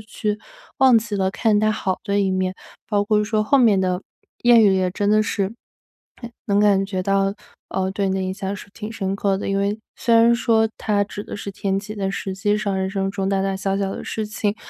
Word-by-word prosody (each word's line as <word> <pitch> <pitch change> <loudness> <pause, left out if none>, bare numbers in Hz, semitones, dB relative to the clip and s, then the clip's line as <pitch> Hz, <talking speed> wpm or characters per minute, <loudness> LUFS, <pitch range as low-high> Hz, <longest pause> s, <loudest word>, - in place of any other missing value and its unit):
去 215 -1 -3 0.4
忘 260 -3 +6
记 220 -1 -1
了 190 -1 +1
看 215 0 +2
它 215 0 +3
好 190 -3 -2
的 200 -1 0
一 195 -1 +2
面， 185 0 -1 0.3
包 205 -1 +1
括 210 0 +2
说 215 0 0
后 280 +5 +4
面 225 -6 +5
的 185 -1 0 0.4
谚 240 -1 +6
语 205 -4 +5
也 185 -1 +1
真 205 +2 0
的 215 0 +4
是 200 -2 -2 1.0
能 200 -1 +2
感 200 -2 +4
觉 190 -1 -3
到， 195 0 +2 0.4
呃， 190 0 -1
对 195 0 -1
你 190 - 0
的 - - -1
印 185 0 -2
象 195 +1 -4
是 - - -10
挺 215 0 -7
深 195 -3 -2
刻 195 -1 0
的。 - - -4
因 195 - 0
为 200 +2 -1 0.2
虽 235 -2 +2
然 230 +1 +6
说 225 -1 +2
它 205 -2 +1
指 205 0 -7
的 - - -7
是 200 - -6
天 195 0 -1
气， 210 +2 -8
但 195 -2 -2
实 195 -1 -4
际 205 +2 0
上 205 -2 -1
人 190 0 -1
生 195 0 -2
中 195 -1 -2
大 195 -1 +1
大 195 0 -1
小 195 0 -1
小 195 -1 -1
的 - - -6
事 220 - -3
情 210 0 -2
200 Hz, 255 characters per minute, -22 LUFS, 195-215 Hz, 1.0 s, 忘